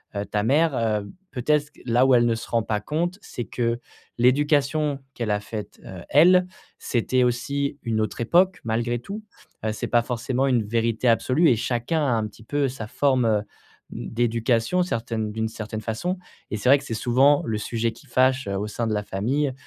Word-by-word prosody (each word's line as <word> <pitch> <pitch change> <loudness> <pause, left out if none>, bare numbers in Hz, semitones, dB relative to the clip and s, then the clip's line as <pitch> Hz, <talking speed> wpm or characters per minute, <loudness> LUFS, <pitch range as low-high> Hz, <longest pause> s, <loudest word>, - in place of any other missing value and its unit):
heu, 100 0 -2
ta 105 0 -1
mère, 150 +5 +3
heu, 105 -3 -1 0.2
peut-être, 150 +3 0
là 125 +1 +3
où 130 - +5
elle 120 -1 +4
ne 115 -1 +2
se 115 - -7
rend 115 -1 +1
pas 105 -1 -1
compte, 170 - -2
c'est 120 - -6
que 120 -1 -1 0.4
l'éducation 145 +3 +2
qu'elle 115 -5 -3
a 105 - 0
faite, 105 0 -7
heu, 90 -2 -9
elle, 180 +4 +6 0.3
c'était 125 +1 +1
aussi 140 +4 -1
une 110 -2 -1
autre 110 +2 -3
époque, 180 +10 +3
malgré 120 +1 -1
tout, 205 - -7 0.4
heu, 110 - 0
c'est - - -4
pas 120 - +4
forcément 125 +2 -1
une 125 -4 +2
vérité 115 +2 0
absolue 125 +8 +3
et 120 - +4
chacun 120 +8 -1
a, 125 - +2
un 110 -2 +1
petit 105 +1 -16
peu, 145 +2 0
sa 120 -4 -7
forme, 130 -1 +2
heu, 110 -2 +3 0.5
mmh, - - -6
d'éducation, 115 +7 +1
certaine 115 -8 -3
d'une 110 0 -1
certaine 110 -1 -6
façon 120 - -2 0.3
et 110 - -1
c'est 115 +5 0
vrai 140 - +8
que - - -12
c'est 115 - -4
souvent 130 +6 +3
le 110 -2 -1
sujet 115 +2 -1
qui 120 +6 -17
fâche, 130 +1 +2
heu, 100 - -2
au 100 - -2
sein 115 +2 -3
de 110 - 0
la 105 - -1
famille 130 +9 -1
120 Hz, 200 wpm, -24 LUFS, 110-140 Hz, 0.5 s, vrai